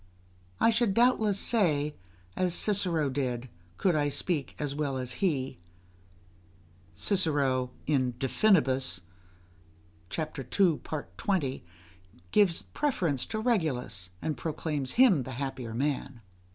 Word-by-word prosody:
I 230 - +5
should 225 -3 +1
doubtless 230 -4 +3
say, 150 - +2 0.4
as 180 -2 0
Cicero 180 -7 +2
did, 130 -2 -2 0.3
could 180 -4 +2
I 145 -1 +2
speak 145 0 -2
as 145 -2 -3
well 140 -2 -2
as 130 -1 -2
he. 135 - 0 1.4
[Cicero, 145 -10 +1 0.2
De 130 -3 0
Finibus, 130 - +2 1.2
ii. 155 - +1 0.4
20, 150 - -1 0.7
gives 195 -5 +3
the - - -26
preference 180 - 0
to - - -3
Regulus, 155 - 0
and 155 - -1
proclaims 145 0 -3
him 235 - +5
the 130 +1 -6
happier 125 -3 -4
man. 135 -2 -2
150 Hz, 110 wpm, -29 LUFS, 130-190 Hz, 1.4 s, I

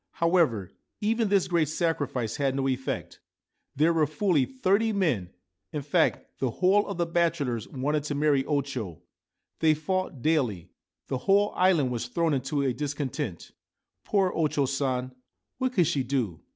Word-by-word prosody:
However, 165 - +2 0.3
even 220 +1 +1
this 200 -2 +3
great 170 -3 +2
sacrifice 145 -8 -1
had 135 -2 0
no 135 0 0
effect. 130 0 -3 0.6
There 160 +4 +3
were 155 -2 +2
fully 155 -2 +1
thirty 225 -3 +1
men; 155 - 0 0.4
in 150 - -4
fact, 155 +3 0
the 130 - 0
whole 190 - +2
of 200 - -4
the 170 - +1
bachelors 165 -9 0
wanted 145 +3 -1
to 145 - -2
marry 145 -2 +2
O 145 -2 +1
Cho; 115 - -6 0.6
they 155 -1 +4
fought 155 -3 -3
daily; 125 - 0 0.4
the 130 - -2
whole 205 +1 +4
island 175 -8 +3
was 120 0 -3
thrown 165 +4 0
into 140 +2 -1
a 130 -2 +1
discontent. 140 - -4 0.5
Poor 195 -3 +2
O 160 -2 +2
Cho 145 -1 0
San! 130 -2 -1 0.5
What 260 -1 0
could 180 -7 +4
she 150 -4 0
do 125 - -2
150 Hz, 160 wpm, -27 LUFS, 130-175 Hz, 0.6 s, they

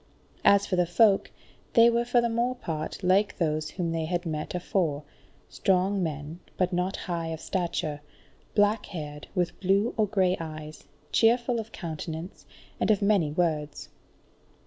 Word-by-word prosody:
As 200 0 +5
for 185 - -1
the 180 -1 +3
folk, 200 +3 +4 0.4
they 230 -1 +7
were 235 0 +2
for 245 0 +3
the 235 - +1
more 240 +2 0
part 160 -5 -5
like 195 +3 +3
those 155 -2 0
whom 175 -3 -3
they 165 -1 -1
had 175 +2 -2
met 155 +1 -3
afore: 170 -5 -1 0.4
strong 190 +1 +1
men, 155 0 -4 0.2
but 185 0 +1
not 180 +2 0
high 170 -3 -2
of 160 -1 -4
stature, 160 -5 -2 0.5
black 205 +1 +3
haired, 150 -4 -7
with 175 -2 -1
blue 200 +4 +2
or 215 -1 +3
grey 190 -3 +2
eyes, 155 -1 -8 0.3
cheerful 235 +1 +3
of 225 0 -7
countenance, 160 +1 -6 0.3
and - - +1
of 210 -2 +3
many 200 -7 +3
words. 150 -2 -1
180 Hz, 155 wpm, -27 LUFS, 160-205 Hz, 0.5 s, they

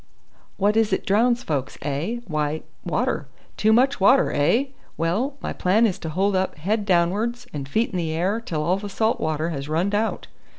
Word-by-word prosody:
"What 205 +2 +2
is 225 -1 +3
it - - 0
drowns 235 +4 +2
folks, 140 -4 -3
eh? 150 +12 -2
Why, 155 -3 -2 0.2
water. - - -1 0.3
Too 215 - +3
much 260 +4 +3
water, 230 +8 +5
eh? 230 - +2 0.3
Well, 205 - 0
my - - -3
plan 205 +6 +3
is 195 -5 -1
to 160 - -5
hold 190 +5 +1
up 185 0 0
head 205 +6 -1
down'ards 205 +7 +1
and 140 -2 -5
feet 220 +10 0
in 185 - -3
the 165 -2 -1
air 185 +8 0
till 155 -9 -3
all 180 +4 +1
the 205 +1 -6
salt 220 +3 0
water 155 +1 -1
has 140 -3 -5
runned 175 +6 0
out." 220 +2 0
190 Hz, 195 wpm, -23 LUFS, 160-225 Hz, 0.3 s, water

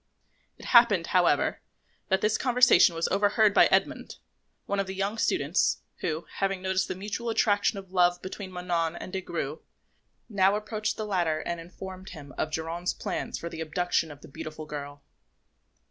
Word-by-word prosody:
It - - -12
happened, 235 -8 +5
however, 180 -1 +2 0.5
that 190 -1 +2
this 215 0 +2
conversation 250 -7 +5
was 165 - 0
overheard 205 +2 +3
by - - +7
Edmond, - - 0 0.5
one 200 - -1
of 195 - -1
the 190 - -5
young 200 +3 -2
students, 145 0 +1
who, 160 -1 -3
having 195 -1 0
noticed 190 0 0
the - - -4
mutual 210 +5 -4
attraction 205 -2 +2
of 190 -1 -9
love 175 -1 +3
between 190 0 -7
Manon 175 -2 -1
and 180 - -8
Des 190 - -2
Grieux, 155 -4 -4 0.7
now 195 -2 +3
approached 215 0 -3
the 215 - -3
latter 170 -6 0
and 170 -1 -4
informed 185 +2 -9
him 145 -5 -11
of 155 - -2
Geronte's 165 +3 -3
plan - - -4
for 170 - -4
the 165 -1 -6
abduction 165 +1 0
of 145 -1 -12
the - - -12
beautiful 155 +1 -8
girl. 145 -1 -7
185 Hz, 170 wpm, -27 LUFS, 165-200 Hz, 0.7 s, by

